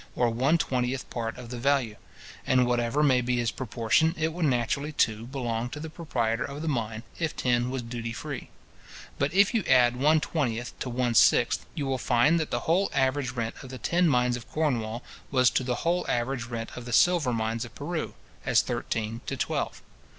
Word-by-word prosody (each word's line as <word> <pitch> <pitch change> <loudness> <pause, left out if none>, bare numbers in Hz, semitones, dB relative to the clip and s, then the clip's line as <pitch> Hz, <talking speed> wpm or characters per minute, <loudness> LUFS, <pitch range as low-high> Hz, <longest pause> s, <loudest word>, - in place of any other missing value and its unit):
or 120 -1 +2
one 130 +8 +2
twentieth 130 -3 -1
part 115 -1 -3
of 125 -2 -9
the 125 - -5
value; 130 -4 +1 0.5
and 130 -1 +4
whatever 120 +4 +1
may 130 -4 +4
be 125 0 0
his 120 -2 0
proportion, 125 +6 +1
it 160 0 0
would 170 -1 -1
naturally, 140 +3 0
too, 115 -5 0
belong 120 -3 -3
to 150 - -7
the 160 +1 -7
proprietor 120 -9 -1
of 145 +2 -6
the - - -3
mine, 115 -5 -2 0.2
if 165 -2 -1
tin 120 0 +1
was 130 -1 -3
duty 115 0 -5
free. 115 - -6 0.7
But 140 +2 +1
if 200 +5 +4
you 225 -4 +1
add 125 -1 +5
one 150 +5 +4
twentieth 120 -7 -2
to 130 - -3
one 120 0 0
sixth, 115 - +4
you 145 - -2
will 135 -1 -1
find 125 +10 +3
that 160 - -2
the - - -1
whole 180 +5 +2
average 130 -1 +1
rent 115 -2 -2
of 135 - -10
the 130 - -7
tin 175 +5 +2
mines 125 -2 +2
of 120 -2 -9
Cornwall, 120 -6 -1 0.3
was 130 -2 +4
to - - +1
the 125 +5 -3
whole 175 +1 +2
average 120 0 -1
rent 115 -1 -5
of 125 - -7
the 120 - -5
silver 175 -3 +4
mines 115 0 -1
of 120 -1 -10
Peru, 160 +2 -4 0.3
as - - +3
thirteen 115 +1 -3
to - - -3
twelve. - - -2
125 Hz, 200 wpm, -27 LUFS, 120-145 Hz, 0.7 s, add